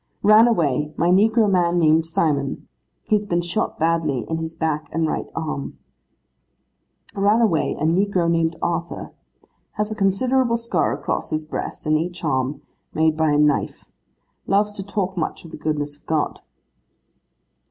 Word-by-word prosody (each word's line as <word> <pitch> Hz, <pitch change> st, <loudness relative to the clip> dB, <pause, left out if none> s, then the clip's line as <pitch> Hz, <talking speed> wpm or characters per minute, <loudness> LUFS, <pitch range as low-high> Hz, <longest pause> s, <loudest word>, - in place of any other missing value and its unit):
'Ran 215 Hz, +3 st, +7 dB
away, 150 Hz, -, +1 dB
my 170 Hz, -, +2 dB
negro 220 Hz, +4 st, +4 dB
man 175 Hz, -3 st, +2 dB
named 160 Hz, -1 st, +3 dB
Simon. 145 Hz, -4 st, -1 dB, 0.4 s
He -, -, -2 dB
has 210 Hz, -, 0 dB
been 175 Hz, -4 st, 0 dB
shot 175 Hz, +5 st, -2 dB
badly, 155 Hz, -5 st, 0 dB
in 160 Hz, -, -2 dB
his 160 Hz, 0 st, -5 dB
back 155 Hz, -2 st, -2 dB
and 165 Hz, +1 st, 0 dB
right -, -, -2 dB
arm.' 155 Hz, -4 st, -4 dB, 1.4 s
'Ran 205 Hz, +3 st, +3 dB
away, 195 Hz, -10 st, +1 dB
a -, -, -3 dB
negro 180 Hz, +2 st, +2 dB
named 165 Hz, -1 st, +1 dB
Arthur. 170 Hz, 0 st, -3 dB, 0.6 s
Has 210 Hz, +1 st, -2 dB
a -, -, -3 dB
considerable 235 Hz, +5 st, +2 dB
scar 235 Hz, 0 st, 0 dB
across -, -, -3 dB
his 155 Hz, -1 st, -2 dB
breast 155 Hz, -, -5 dB
and 155 Hz, 0 st, +2 dB
each 175 Hz, +2 st, -5 dB
arm, 135 Hz, -2 st, -1 dB, 0.3 s
made 160 Hz, 0 st, +3 dB
by 160 Hz, 0 st, +1 dB
a 145 Hz, -, +2 dB
knife; 150 Hz, -1 st, +1 dB, 0.6 s
loves 205 Hz, +1 st, +2 dB
to 205 Hz, -2 st, -6 dB
talk 195 Hz, -1 st, -3 dB
much 170 Hz, 0 st, -3 dB
of 165 Hz, -, -11 dB
the -, -, -7 dB
goodness 145 Hz, -1 st, -2 dB
of -, -, -38 dB
God. 155 Hz, -2 st, -1 dB
165 Hz, 160 wpm, -22 LUFS, 155-200 Hz, 1.4 s, Ran